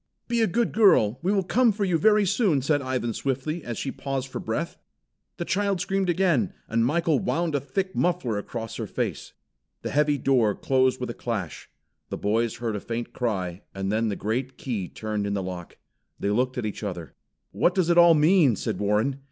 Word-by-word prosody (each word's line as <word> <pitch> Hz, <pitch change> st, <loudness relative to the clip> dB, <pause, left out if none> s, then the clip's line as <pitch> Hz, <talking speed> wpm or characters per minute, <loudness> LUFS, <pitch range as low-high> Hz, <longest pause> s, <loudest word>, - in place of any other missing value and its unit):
"Be 235 Hz, -1 st, +1 dB
a 225 Hz, -, +4 dB
good 235 Hz, +6 st, 0 dB
girl! 130 Hz, -, +4 dB
We 180 Hz, +4 st, +1 dB
will 200 Hz, -2 st, +2 dB
come 235 Hz, +5 st, +3 dB
for 205 Hz, 0 st, -1 dB
you 175 Hz, -3 st, +1 dB
very 210 Hz, +1 st, +4 dB
soon," 180 Hz, -, +2 dB
said 145 Hz, +1 st, +2 dB
Ivan 130 Hz, -3 st, -2 dB
swiftly, 140 Hz, +7 st, -2 dB
as 120 Hz, -2 st, -5 dB
she 135 Hz, -, -3 dB
paused 135 Hz, -1 st, -4 dB
for -, -, -5 dB
breath. -, -, -3 dB, 0.6 s
The 170 Hz, -, -3 dB
child 200 Hz, 0 st, 0 dB
screamed 190 Hz, +1 st, 0 dB
again, 170 Hz, -, +2 dB
and 115 Hz, 0 st, +1 dB
Michael 155 Hz, +4 st, +2 dB
wound 170 Hz, -4 st, -1 dB
a 145 Hz, -, +2 dB
thick 185 Hz, +8 st, -3 dB
muffler 170 Hz, -12 st, 0 dB
across 115 Hz, +1 st, -6 dB
her -, -, -4 dB
face. -, -, -4 dB, 0.5 s
The -, -, -3 dB
heavy 150 Hz, 0 st, +2 dB
door 120 Hz, -6 st, +2 dB
closed 130 Hz, -1 st, +1 dB
with 125 Hz, -1 st, -3 dB
a -, -, -6 dB
clash. 105 Hz, -10 st, -5 dB, 0.4 s
The -, -, -4 dB
boys 110 Hz, +2 st, 0 dB
heard 115 Hz, -2 st, -3 dB
a -, -, -2 dB
faint 120 Hz, +3 st, -5 dB
cry, 95 Hz, -6 st, -2 dB
and 95 Hz, 0 st, -2 dB
then 110 Hz, +1 st, +1 dB
the 100 Hz, -, -2 dB
great 125 Hz, +6 st, -3 dB
key 105 Hz, -9 st, -4 dB
turned 105 Hz, -2 st, -3 dB
in 100 Hz, -, -1 dB
the 95 Hz, -, -2 dB
lock. 90 Hz, -2 st, -7 dB, 0.4 s
They 100 Hz, -, 0 dB
looked 125 Hz, +4 st, 0 dB
at 120 Hz, -, -2 dB
each 105 Hz, -, -4 dB
other. 90 Hz, -6 st, -5 dB, 0.4 s
"What 180 Hz, -, +2 dB
does 180 Hz, -3 st, +2 dB
it 170 Hz, -, +3 dB
all 170 Hz, -1 st, +8 dB
mean?" 155 Hz, -, +4 dB
said -, -, -3 dB
Warren. 105 Hz, +7 st, +1 dB
130 Hz, 205 wpm, -25 LUFS, 110-175 Hz, 0.6 s, all